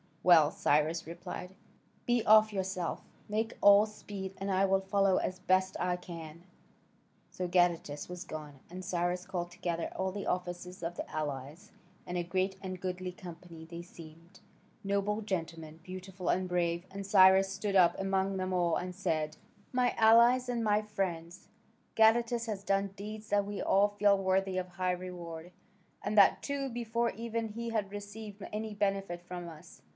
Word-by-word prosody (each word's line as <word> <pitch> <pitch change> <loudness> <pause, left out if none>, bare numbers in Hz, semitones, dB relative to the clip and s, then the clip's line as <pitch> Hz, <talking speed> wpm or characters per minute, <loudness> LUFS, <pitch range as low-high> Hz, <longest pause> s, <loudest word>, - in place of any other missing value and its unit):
"Well," 160 -4 +6
Cyrus 155 +2 +1
replied, 180 +2 -7 0.5
"be 240 -2 +2
off 215 0 +6
yourself: 190 -3 -3 0.2
make 220 +2 -2
all 205 +1 +7
speed, 200 -2 -7
and 195 0 -3
I 190 +1 +3
will 195 0 +3
follow 195 -1 +2
as 185 0 -2
best 185 0 +2
I 180 0 +1
can." 170 -2 -9 0.9
So 180 - -3
Gadatas 175 -5 +1
was 180 0 -7
gone, 150 -5 -8
and 185 +1 -8
Cyrus 180 0 -1
called 175 -2 -3
together 175 -2 -3
all 190 0 -1
the 200 +1 -5
officers 180 0 -4
of 170 +1 -3
the - - -6
allies, 150 +5 -5 0.3
and 180 - -4
a 175 - 0
great 185 +2 -1
and 185 -1 -5
goodly 185 0 -4
company 170 -2 -11
they 170 +1 -8
seemed, 170 +1 -14 0.4
noble 200 +2 0
gentlemen, 165 -5 -4
beautiful 185 0 -6
and 185 0 +1
brave. 175 -1 0
And 195 +1 -6
Cyrus 190 -1 +6
stood 195 +1 -2
up 175 -2 +5
among 195 0 0
them 185 0 -2
all 175 -2 +2
and 180 0 -3
said: 155 -5 -1 0.3
"My 250 -1 +2
allies 235 +3 +6
and 235 -2 -1
my 210 -1 +3
friends, 180 -5 -4 0.5
Gadatas 230 +1 +4
has 210 -4 -4
done 195 -1 0
deeds 215 +2 -8
that 205 0 +2
we 205 0 -4
all 200 +1 +4
feel 205 -1 +3
worthy 190 0 +1
of 185 -1 -2
high 180 0 -1
reward, 175 -2 -7 0.5
and 205 +1 -2
that 200 - +6
too 280 -1 -2
before 235 -1 -1
ever 230 0 -2
he 230 +2 -5
had 210 -4 -2
received 205 0 -8
any 215 0 -4
benefit 195 -3 -1
from 175 -1 -7
us. 160 -2 -13
190 Hz, 165 wpm, -31 LUFS, 175-205 Hz, 0.9 s, all